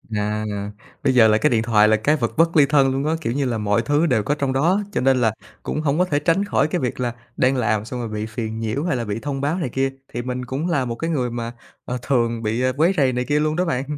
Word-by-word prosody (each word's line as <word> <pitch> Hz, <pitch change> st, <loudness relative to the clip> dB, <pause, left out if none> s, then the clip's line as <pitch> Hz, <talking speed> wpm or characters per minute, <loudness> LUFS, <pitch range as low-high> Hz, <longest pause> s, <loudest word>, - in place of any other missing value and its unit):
À, 105 Hz, +1 st, -1 dB, 0.6 s
bây 135 Hz, -2 st, +3 dB
giờ 115 Hz, -3 st, +6 dB
là 110 Hz, 0 st, +4 dB
cái -, -, +2 dB
điện 115 Hz, -2 st, +1 dB
thoại 105 Hz, -2 st, +4 dB
là 110 Hz, -, +4 dB
cái 145 Hz, +8 st, +2 dB
vật 115 Hz, -6 st, -1 dB
bất 165 Hz, 0 st, +3 dB
ly 145 Hz, -, +7 dB
thân 140 Hz, -2 st, +3 dB
luôn 135 Hz, +2 st, -1 dB
á. 160 Hz, +1 st, +1 dB
Kiểu 115 Hz, -, -2 dB
như 140 Hz, +1 st, 0 dB
là 120 Hz, -3 st, -1 dB
mọi 105 Hz, +1 st, +1 dB
thứ 145 Hz, +5 st, +1 dB
đều 120 Hz, -8 st, +2 dB
có 145 Hz, +8 st, 0 dB
trong 140 Hz, -2 st, -1 dB
đó, 170 Hz, +9 st, +2 dB
cho -, -, -1 dB
nên 130 Hz, 0 st, +3 dB
là 110 Hz, -2 st, +2 dB, 0.3 s
cũng 150 Hz, -, -2 dB
hông 150 Hz, 0 st, 0 dB
có 180 Hz, -, +4 dB
thể 145 Hz, -5 st, 0 dB
tránh 170 Hz, +7 st, +1 dB
khỏi 180 Hz, -, +1 dB
cái 175 Hz, +1 st, -2 dB
việc 125 Hz, -1 st, -2 dB
là 120 Hz, -2 st, -1 dB, 0.2 s
đang 130 Hz, +1 st, +3 dB
làm 110 Hz, -3 st, 0 dB
xong 125 Hz, +2 st, -5 dB
rồi 115 Hz, -2 st, -4 dB
bị 105 Hz, 0 st, -3 dB
phiền 110 Hz, 0 st, -5 dB
nhiễu 115 Hz, +6 st, -2 dB
hay 170 Hz, -6 st, 0 dB
là 120 Hz, -, -3 dB
bị 105 Hz, +1 st, -3 dB
thông 135 Hz, +1 st, -4 dB
báo 150 Hz, +5 st, 0 dB
này 155 Hz, -8 st, -2 dB
kia. 135 Hz, +2 st, -1 dB, 0.2 s
Thì 120 Hz, -, -2 dB
mình 125 Hz, 0 st, -4 dB
cũng 140 Hz, +8 st, -3 dB
là 145 Hz, -6 st, +1 dB
một 120 Hz, -1 st, -3 dB
cái 165 Hz, +7 st, -3 dB
người 130 Hz, -6 st, 0 dB
mà, 115 Hz, 0 st, -4 dB, 0.3 s
ờ, 125 Hz, -, -3 dB
thường 115 Hz, -4 st, 0 dB
bị, 110 Hz, +3 st, -1 dB
ờ, 130 Hz, 0 st, +1 dB
quấy 170 Hz, +5 st, +3 dB
rầy 135 Hz, -4 st, +3 dB
này 125 Hz, 0 st, -1 dB
kia 145 Hz, 0 st, +1 dB
luôn 155 Hz, 0 st, 0 dB
đó 180 Hz, +2 st, +1 dB
bạn. 145 Hz, -2 st, -2 dB
130 Hz, 295 wpm, -21 LUFS, 115-150 Hz, 0.6 s, ly